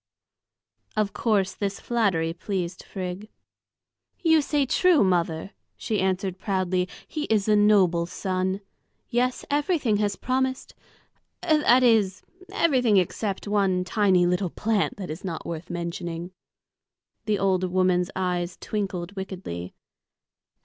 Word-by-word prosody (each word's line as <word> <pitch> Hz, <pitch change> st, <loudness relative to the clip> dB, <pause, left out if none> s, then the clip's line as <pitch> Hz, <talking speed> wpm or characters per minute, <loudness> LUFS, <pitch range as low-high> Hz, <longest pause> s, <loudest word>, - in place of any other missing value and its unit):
Of 210 Hz, -2 st, +1 dB
course 200 Hz, -5 st, +1 dB
this 200 Hz, -1 st, -3 dB
flattery 190 Hz, -9 st, 0 dB
pleased 180 Hz, 0 st, -4 dB
Frigg. 190 Hz, +2 st, -6 dB, 0.9 s
"You 320 Hz, -2 st, +5 dB
say 290 Hz, -1 st, +1 dB
true, 345 Hz, -, +4 dB
mother," 175 Hz, -1 st, 0 dB, 0.3 s
she 215 Hz, -2 st, -2 dB
answered 190 Hz, 0 st, -1 dB
proudly, 185 Hz, -2 st, 0 dB, 0.2 s
"he 305 Hz, -1 st, -3 dB
is 215 Hz, -2 st, +1 dB
a 215 Hz, -, +4 dB
noble 190 Hz, -5 st, +4 dB
son. 185 Hz, +1 st, -2 dB, 0.5 s
Yes, 250 Hz, +1 st, 0 dB
everything 290 Hz, -, +1 dB
has 205 Hz, -1 st, 0 dB
promised, 260 Hz, +3 st, -2 dB, 0.7 s
that 300 Hz, -7 st, +4 dB
is, 215 Hz, -6 st, +3 dB, 0.3 s
everything 250 Hz, -10 st, +3 dB
except 195 Hz, +2 st, -1 dB
one 195 Hz, -3 st, +2 dB
tiny 185 Hz, -2 st, +3 dB
little 180 Hz, +1 st, +1 dB
plant 215 Hz, +3 st, 0 dB
that 185 Hz, -6 st, -5 dB
is 160 Hz, -, -7 dB
not 170 Hz, -4 st, -5 dB
worth 165 Hz, +2 st, -6 dB
mentioning." 170 Hz, 0 st, -4 dB, 0.9 s
The 210 Hz, -1 st, +1 dB
old 190 Hz, -1 st, +1 dB
woman's 180 Hz, 0 st, +2 dB
eyes 180 Hz, -1 st, -2 dB
twinkled 195 Hz, -3 st, -4 dB
wickedly. 180 Hz, -, -6 dB
195 Hz, 120 wpm, -25 LUFS, 180-215 Hz, 0.9 s, You